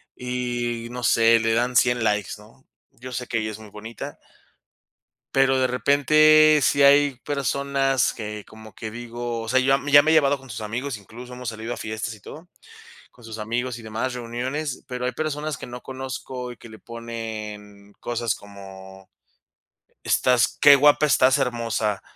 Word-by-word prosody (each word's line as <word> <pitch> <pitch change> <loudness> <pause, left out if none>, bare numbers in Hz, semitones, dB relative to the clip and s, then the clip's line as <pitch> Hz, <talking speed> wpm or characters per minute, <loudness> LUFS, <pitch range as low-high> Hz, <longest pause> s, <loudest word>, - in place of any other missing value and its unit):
y, 120 -2 -3
no 125 0 -6
sé, 115 0 +4
le 115 0 +1
dan 120 +2 0
100 120 -1 +3
likes, 105 -3 0
¿no? 110 +5 -20 0.2
Yo 125 +2 -11
sé 125 +1 -4
que 115 -1 -2
ella 110 - -3
es 105 - -8
muy 110 -2 -13
bonita. 110 +2 -8 1.2
Pero 135 -1 +3
de 130 - +3
repente, 155 +4 +5
sí 140 +1 +3
hay 140 0 +5
personas 140 -1 0
que 105 -2 -7
como 110 -1 -14
que 110 - -7
digo 120 0 -5
o 115 - -7
sea, 130 +3 +3
ya 135 +1 +3
me 140 +1 -6
ya 145 +1 +9
me 155 +2 +1
he - - +4
llevado 145 -3 +4
con 135 -1 -16
sus 110 -1 -6
amigos, 120 +4 -4
incluso 120 +5 -12
hemos 125 -1 -5
salido 115 +1 -6
a - - -8
fiestas 110 +1 -5
y - - -17
todo, 160 - -12 0.6
con 120 - -19
sus 110 0 -8
amigos 120 +3 -3
y - - -12
demás 115 +4 -3
reuniones. 125 +4 -4
Pero 125 -1 -4
hay 125 - -1
personas 150 +1 -3
que - - -9
no 125 0 -8
conozco 130 -1 -6
y 120 - -10
que 115 - -14
le 110 -1 -13
ponen 110 -3 -8
cosas 120 -2 -2
como: 95 -1 -13 0.9
"Estás 125 -3 +2
qué 145 -1 +9
guapa 145 +2 +4
estás 135 -1 +4
hermosa" 115 -5 -1
120 Hz, 180 wpm, -23 LUFS, 110-135 Hz, 1.2 s, ya